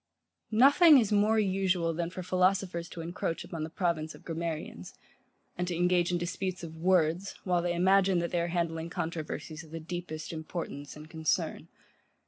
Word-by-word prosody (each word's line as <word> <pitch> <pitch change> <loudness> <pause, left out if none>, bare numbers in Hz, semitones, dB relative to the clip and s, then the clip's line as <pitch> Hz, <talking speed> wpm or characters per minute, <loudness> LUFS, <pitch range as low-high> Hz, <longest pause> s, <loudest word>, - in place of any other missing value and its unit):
Nothing 285 +6 +8
is 220 -5 +2
more 210 +2 +3
usual 190 -4 +1
than 170 +1 -2
for 185 +1 -6
philosophers 185 -1 +1
to 170 - -7
encroach 165 0 -3
upon 165 -2 -5
the 160 - -4
province 165 -3 -1
of - - -16
grammarians; 160 - -5 0.6
and 180 0 -2
to 175 - -2
engage 175 0 +2
in 175 - +1
disputes 180 +1 -3
of 165 -1 -7
words, 175 +1 +1
while 180 -2 +1
they 175 0 -1
imagine 190 +1 +4
that 170 0 -1
they 175 - +1
are 170 - -1
handling 165 -1 -2
controversies 160 -1 -4
of 160 - -15
the 165 +1 -6
deepest 165 -1 -6
importance 155 -3 -6
and 150 +1 -11
concern. 160 -1 -1
175 Hz, 170 wpm, -30 LUFS, 165-185 Hz, 0.6 s, Nothing